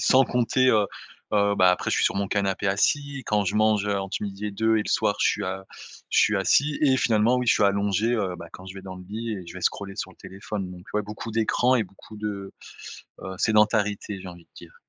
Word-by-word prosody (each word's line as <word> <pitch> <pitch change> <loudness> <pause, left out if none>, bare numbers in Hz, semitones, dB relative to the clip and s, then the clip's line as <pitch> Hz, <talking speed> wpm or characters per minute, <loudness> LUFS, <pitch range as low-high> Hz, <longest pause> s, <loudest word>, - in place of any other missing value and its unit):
sans 130 0 +5
compter, 125 +2 +2
heu 105 -3 +3 0.5
heu, 100 -1 +3
bah 95 -2 +5
après 90 - -1
je - - +2
suis - - +2
sur - - +2
mon 100 - 0
canapé 100 0 -1
assis, 140 +8 0
quand 105 -1 +1
je 95 +2 -1
mange 110 -1 +3
entre 100 -1 -1
12:00 100 0 -5
et - - -3
2 110 +2 +1
et 105 - +1
le - - -6
soir - - +2
je - - +4
suis - - -1
a 95 +1 -4 0.5
je - - +3
suis 105 - +4
assis. 140 +9 +2
Et 135 -3 +4
finalement, 115 0 +3
oui 125 - -1
je 115 - +6
suis - - +2
allongé, 100 +1 +2
heu, 95 -6 -1
bah 85 -1 -10
quand 95 +1 -11
je 95 - -9
vais 95 - -9
dans 95 -1 -8
le 90 - -11
lit 110 +1 -4
et 90 -3 -8
je 85 - -10
vais 95 - -7
scroller 100 +2 -2
sur - - -5
le - - -19
téléphone. 95 0 -6
Donc, 90 0 -12
ouais, 105 - +1
beaucoup 105 +2 -7
d'écrans 115 +3 +2
et 115 - +1
beaucoup 100 +3 -15
de, 100 -2 -5 0.7
heu, 95 - -6
sédentarité, 105 -2 +1
j'ai 95 - -8
envie 85 -1 -12
de - - -54
dire. - - -13
105 Hz, 250 wpm, -25 LUFS, 95-110 Hz, 0.7 s, je